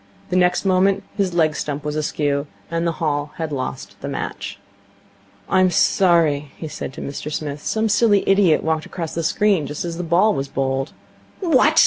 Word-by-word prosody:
The - - +1
next 180 +1 +3
moment 195 +1 +3
his 190 -4 0
leg 155 -3 +3
stump 145 -1 -3
was 150 0 -2
askew; 145 -1 -1 0.2
and 165 0 0
the 165 - 0
Hall 150 -3 -2
had 160 -2 -4
lost 130 -3 -5
the - - -5
match. - - -5 0.9
'I'm 185 0 +4
sorry,' 160 -5 +3
he 160 - -6
said 150 - -6
to - - -8
Mr 145 +2 -5
Smith. 145 -1 -4
'Some 220 0 0
silly 205 -1 +3
idiot 195 -5 +4
walked 160 -1 -1
across 165 -3 -5
the 165 - -1
screen 180 -1 +2
just 150 +4 -4
as 170 -1 -4
the 180 - -3
ball 180 +6 +3
was 135 -5 -2
bowled.' 135 +1 -2 0.5
'What!' 330 -9 +4
165 Hz, 180 wpm, -21 LUFS, 150-185 Hz, 0.9 s, I'm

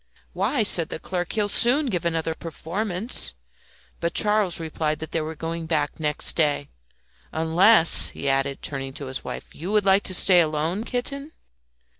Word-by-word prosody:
"Why," 215 +7 0
said 170 -5 +5
the - - -5
clerk, 175 +1 -4
"he 215 - 0
will 205 - 0
soon 250 +8 +3
give 180 -9 -2
another 165 -1 -1
performance." 180 - -2 0.6
But 170 0 -3
Charles 210 -5 +2
replied 155 -1 -2
that 160 - -8
they 165 - -1
were 155 +1 -5
going 165 +1 -5
back 155 -2 -1
next 150 -2 0
day. 145 -3 0 0.6
"Unless," 165 +3 +4
he 140 - -6
added, 135 0 0
turning 135 -2 -5
to 140 - -8
his 130 0 -7
wife, - - -8
"you 175 +6 -6
would 210 -2 +2
like 195 +1 +4
to 185 - +2
stay 180 -1 +5
alone, 160 +6 -2
kitten?" 275 +5 -3
170 Hz, 170 wpm, -23 LUFS, 155-205 Hz, 0.6 s, said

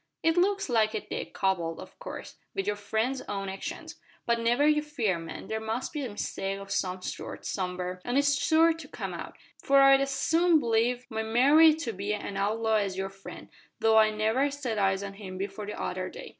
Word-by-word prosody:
"It 325 0 +3
looks 395 +3 +2
like 220 -4 +2
it, - - -5
Dick, - - -4
coupled, 175 -4 -1
of - - -12
course, - - -8 0.2
wi' 390 - 0
your 210 - 0
friend's 220 +6 -1
own 195 -1 -3
actions. 190 0 -6 0.3
But 235 0 +2
never 240 +5 +2
you 300 0 +4
fear, 240 - -1
man. 165 0 -8
There 220 - -3
must 220 +3 -3
be 300 -2 -3
a 255 - -3
mistake 195 -1 -3
o' 195 - -8
some 185 -1 -2
sort, - - -6
somewhere, 180 -1 -3
an' 245 +2 -1
it's 285 0 +4
sure 325 +1 +5
to 325 -3 -10
come - - -5
out, - - -8 0.3
for 275 0 +5
I'd 275 0 +7
as 275 - 0
soon 325 +5 +3
believe 240 0 +1
my 220 0 -1
Mary 280 +8 +6
to 280 -8 -4
be 200 +2 -2
an 200 -1 -6
outlaw 220 +3 +1
as 195 -3 -1
your 195 0 -2
friend 195 0 -11 0.3
though 220 0 +4
I 215 0 +5
never 220 +6 +1
set 265 -6 -3
eyes 195 0 +1
on 200 0 -6
him 195 -2 -8
before 200 +2 -5
the 210 - -6
other - - -3
day. - - -9
220 Hz, 210 wpm, -28 LUFS, 195-275 Hz, 0.3 s, I'd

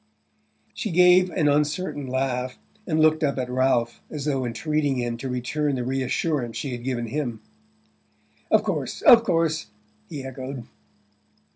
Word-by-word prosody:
She - - -4
gave 180 +1 +5
an 160 -3 0
uncertain 145 0 0
laugh, 130 -1 -2 0.3
and 160 -3 +1
looked 155 0 +4
up 140 -2 +1
at 125 -1 -3
Ralph 125 -2 +1
as 145 -2 -5
though 135 -4 0
entreating 145 +4 -1
him 120 -1 -2
to 130 +2 -5
return 135 +4 -1
the 125 - -2
reassurance 130 0 -1
she 140 - -4
had 120 -1 -6
given 125 -2 -2
him. 120 -2 -3 1.1
"Of - - +4
course, - - -3
of 240 -6 +8
course," 165 -5 0 0.4
he 145 -3 -6
echoed. 130 -1 -6
135 Hz, 145 wpm, -24 LUFS, 125-155 Hz, 1.1 s, of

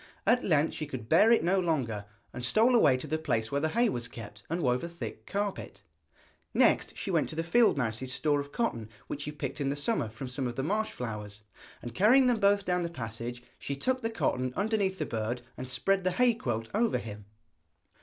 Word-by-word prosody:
At 240 +4 +4
length 155 -3 +2
she 155 - -4
could 130 -6 -6
bear 205 - +6
it 230 - +4
no 185 +3 +3
longer, 130 - -1 0.3
and 125 - -6
stole 220 - +4
away 215 - +5
to 130 - -7
the 155 - -2
place 115 -8 -1
where 140 0 0
the 160 - +1
hay 235 +7 +3
was 120 - -2
kept, 105 -2 -10
and 170 +1 -1
wove 125 +1 +1
a 170 - -4
thick 170 0 -8
carpet. 200 0 -3 0.7
Next - - +3
she 195 - -3
went 165 -4 +1
to 160 - -6
the 165 - -1
field 220 +2 +4
mouse's 125 0 -2
store 145 +2 +1
of 140 0 -6
cotton 115 - -2 0.2
which 145 - -5
she 150 - -4
picked 145 -1 -5
in 135 - 0
the 140 - -1
summer 145 - -1
from 120 +4 -7
some 125 +1 -3
of 120 - -5
the 135 - -2
marsh 215 +7 0
flowers, 105 -3 -6 0.4
and 120 - -6
carrying 245 - +5
them 245 -3 +2
both 200 -1 +3
down 180 0 +1
the 170 - -2
passage, 120 -4 -6 0.2
she 140 - -4
tucked 255 - 0
the 225 - -1
cotton 130 - -1
underneath 200 -2 0
the - - -2
bird 115 +2 -3
and 130 0 -7
spread 195 +8 +1
the 185 - +2
hay 245 +4 +4
quilt 115 - -3
over 225 +2 +2
him. 105 -2 -8
145 Hz, 225 wpm, -30 LUFS, 120-200 Hz, 0.7 s, bear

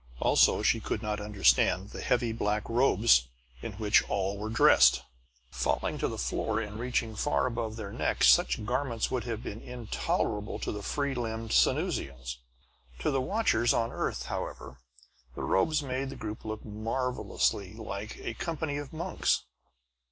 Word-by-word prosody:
Also, - - +4
she - - +3
could - - -3
not 105 -1 -2
understand 100 -1 +2
the - - -7
heavy 120 -2 +1
black 105 -2 -1
robes 115 - +4 0.3
in 110 - -5
which 105 +1 +3
all 100 0 0
were 105 +2 -5
dressed. 65 - +6 0.5
Falling - - -1
to - - +1
the - - -5
floor 105 - -1
and 105 -1 -5
reaching 120 -2 -1
far 145 +6 +1
above 115 -3 -3
their 105 -3 -6
necks, - - +2
such 60 - +2
garments 125 -1 -1
would 125 -2 -1
have 115 -2 -4
been 105 - -6
intolerable 110 -3 -2
to - - -3
the 105 - -5
free 140 +5 -1
limbed 115 -2 -4
Sanusians. 65 -3 +1 0.6
To 60 - 0
the 135 - +1
watchers 130 - +2
on 115 0 +1
the - - -9
earth, - - -2
however, 65 - -6 0.6
the - - -5
robes 155 +11 +2
made 135 0 -3
the 135 - -7
group 110 0 -7
look 110 0 -5
marvelously 110 -2 -1
like 105 -1 -6
a - - -3
company 160 +3 -3
of 145 -2 -6
monks. 170 +4 0
110 Hz, 160 wpm, -29 LUFS, 105-125 Hz, 0.6 s, dressed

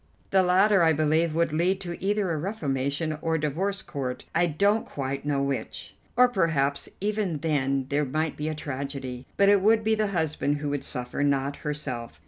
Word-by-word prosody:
The 190 - +5
latter, 190 +2 +4
I 165 -1 +5
believe, 155 +1 +2
would 165 -2 +1
lead 180 +4 +2
to 175 -1 -6
either 200 -2 +1
a 160 - -1
reformation 150 -4 -2
or 165 0 0
the 155 -1 0
divorce 195 +7 -2
court, 130 -3 -5
I 175 +1 +3
don't 200 +7 +2
quite 140 0 -4
know 140 -2 +1
which. 140 -1 -4 0.2
Or 250 0 +7
perhaps 160 - 0
even 205 -5 -1
then 140 -4 0
there 145 +1 +1
might 155 +3 -1
be 150 +1 -3
a 155 - -3
tragedy; 135 -3 -5
but 200 - +5
it 200 -1 +5
would 220 +2 +4
be 220 +1 +2
the 215 -1 +1
husband 160 -5 0
who 145 0 -3
would 145 -1 -2
suffer, 125 +1 -4
not 140 0 +1
herself. 140 -6 -5
155 Hz, 190 wpm, -26 LUFS, 140-190 Hz, 0.2 s, Or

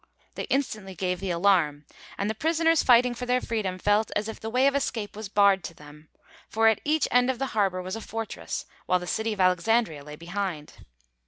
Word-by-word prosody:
They - - -5
instantly 215 -8 -2
gave 180 0 -2
the 195 - -4
alarm, 170 -5 +2 0.3
and 200 - -1
the 220 - -1
prisoners 325 +6 +2
fighting 245 0 +5
for 245 +1 -6
their 250 0 +2
freedom 210 -7 -3
felt 205 +3 +2
as 210 +1 0
if 220 - -7
the 225 - -5
way 250 +3 +2
of 280 - +4
escape 225 -7 -2
was 215 -1 -7
barred 200 -2 +4
to 165 - -8
them. 150 +1 -15 0.4
For 225 0 +3
at 220 - +3
each 310 +1 +1
end 250 +1 +4
of 260 - 0
the 270 - -1
harbour 195 -4 0
was 185 +3 -4
a 225 - -6
fortress, 225 0 -5 0.2
while 185 - +3
the 180 - -7
city 220 +5 -1
of 210 - -5
Alexandria 185 -2 +2
lay 150 +1 -9
behind. 175 -2 -5
205 Hz, 215 wpm, -26 LUFS, 185-235 Hz, 0.4 s, fighting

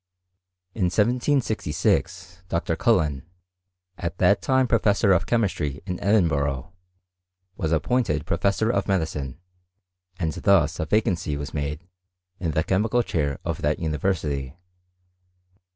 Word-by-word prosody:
In 95 - 0
1766 105 - 0
Dr. 85 0 -1
Cullen, 80 - +2 0.8
at 85 0 -4
that 100 - +3
time 130 -2 +2
professor 105 -3 +3
of 90 - +2
chemistry 90 - 0
in 90 -2 -4
Edin 100 -3 +3
burgh, 70 0 -2 0.8
was 80 - -2
appointed 80 - +1
professor 105 +3 +1
of - - -1
medicine, 80 -7 -2 0.8
and 80 -5 -1
thus 85 -6 +2
a 80 - -2
vacancy 90 -7 0
was 70 0 -6
made 75 +3 -4 0.5
in 85 - -2
the 80 0 +1
chemical 110 +7 +1
chair 70 -8 -1
of - - -3
that 75 +1 +1
university. 75 -4 -2
85 Hz, 120 wpm, -24 LUFS, 75-105 Hz, 0.8 s, that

